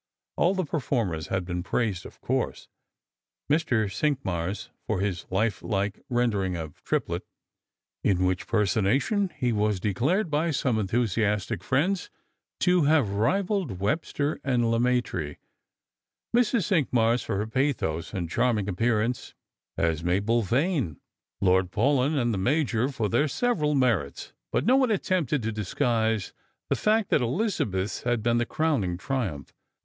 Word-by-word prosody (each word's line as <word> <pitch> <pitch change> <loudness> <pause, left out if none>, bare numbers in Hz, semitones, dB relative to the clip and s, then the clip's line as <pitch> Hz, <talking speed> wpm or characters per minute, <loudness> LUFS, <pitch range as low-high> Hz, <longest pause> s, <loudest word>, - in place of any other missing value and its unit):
All 180 +3 +2
the 185 -2 0
per 155 +2 -2
formers 100 - -1
had 95 -2 -1
been 90 -1 -3
praised, 100 -2 -1
of - - -17
course - - -2 0.4
— - - -55
Mr. 140 -8 +2
Cinqmars 105 - -2 0.2
for 110 -4 0
his 95 -3 -2
life 100 +1 0
like 100 -2 -1
rendering 105 -7 +1
of 80 -2 -8
Triplet, - - -1 0.8
in 95 -2 +2
which 90 0 -1
personation 115 - +1
he 125 -4 +1
was 105 -2 +1
declared 145 - 0
by 155 +3 +1
some 130 -6 +1
enthusiastic 105 -2 0
friends 180 - 0 0.5
to 180 -2 +4
nave 145 -7 +3
rivalled 175 - 0
Webster 145 - -1
and 120 -4 +1
Leraaitre; 115 -10 0 1.0
Mrs. 235 -3 +3
Cinqmars 125 - +2
for - - -2
her 105 - -1
pathos 110 - -1
and 90 -4 -3
charming 105 +2 +1
appear 105 +3 +1
ance 120 +1 -4 0.4
as 80 -1 0
Mabel 100 +7 +2
Vane; 125 - 0 0.4
Lord 95 -1 +3
Paulyn 135 - +2
and 120 -3 +1
the 100 - -1
Major 125 +1 +1
for 115 -6 -1
their 120 +8 +2
"leveral 150 - +1
merits; 115 - 0 0.2
but - - 0
no 255 +3 +5
one 260 -3 +3
attempted 175 - 0
to 110 0 -2
disc^uise 110 +1 0 0.4
the - - +4
fact 215 -1 +1
that - - +4
Elizabeth's 115 - -1
had 120 -3 0
been 120 0 +2
the 120 - 0
crowning 125 - 0
triumph. 100 - -3
115 Hz, 145 wpm, -27 LUFS, 100-145 Hz, 1.0 s, no